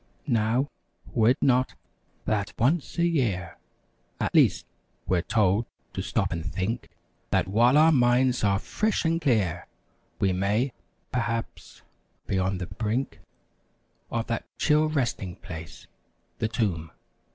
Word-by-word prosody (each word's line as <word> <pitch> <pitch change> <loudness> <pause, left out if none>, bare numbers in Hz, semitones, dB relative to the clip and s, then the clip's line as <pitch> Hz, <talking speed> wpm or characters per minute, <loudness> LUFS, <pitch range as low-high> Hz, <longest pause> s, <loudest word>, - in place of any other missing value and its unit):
Now, 120 +1 +1 0.5
were 115 -1 +4
it 125 - +3
not, 130 0 +3 0.5
that 105 -2 -1
once 140 +9 +1
a 170 - +3
year 110 - 0 0.6
At - - -1
least, - - +4 0.4
we're 90 -2 +1
told 105 +3 +2 0.3
to - - -3
stop - - -1
and 85 -1 -3
think 95 +10 -3 0.4
That - - +1
while 120 +8 +4
our 160 +2 +7
minds 125 -2 +3
are 100 -1 +3
fresh 210 - -1
and 165 +1 +1
clear 100 - +1 0.5
We 95 -1 +2
may, 105 +7 0 0.4
perhaps, 115 -2 -3 0.4
be 95 - 0
on 95 +1 0
the 90 - -4
brink 110 +8 -2 0.9
Of 115 0 -2
that 115 - -3
chill 155 0 +3
resting 120 - -1
place—the 80 +4 -9
tomb! 95 -9 -1
115 Hz, 130 wpm, -26 LUFS, 95-130 Hz, 0.9 s, our